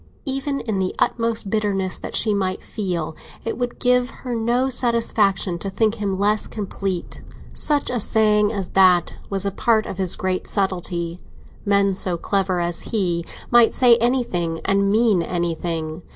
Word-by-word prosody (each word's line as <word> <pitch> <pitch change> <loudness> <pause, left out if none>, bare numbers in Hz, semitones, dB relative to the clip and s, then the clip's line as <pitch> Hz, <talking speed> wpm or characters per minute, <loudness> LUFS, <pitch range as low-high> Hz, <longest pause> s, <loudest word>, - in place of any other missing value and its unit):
Even 275 0 -2
in 215 -4 -2
the 185 -1 -1
utmost 230 -3 0
bitterness 195 -4 0
that - - -6
she 215 - +4
might 190 -2 -2
feel, 175 -7 -3 0.3
it 230 - -2
would 245 -1 -3
give 250 0 +2 0.2
her 250 - -2
no 235 +3 +1
satisfaction 220 -7 +1
to 195 - -4
think 215 +2 +1
him 195 -2 -1
less 210 +2 +2
complete. 195 -3 -4 0.3
Such 295 -2 0
a 245 - -1
saying 210 -1 +3
as 195 -5 -4
that 185 -2 +4
was 195 -1 -2
a 200 - 0
part 220 +2 +1
of 190 - -7
his 185 -2 +1
great 185 -1 -2
subtlety—men 190 +1 -1
so 185 -2 -2
clever 190 0 0
as 170 0 -2
he 175 -6 0 0.3
might 240 -1 +6
say 245 -2 +6
anything 225 -9 0
and 200 0 +2
mean 215 -4 +3
anything. 165 -2 -3
200 Hz, 155 wpm, -21 LUFS, 185-230 Hz, 0.3 s, might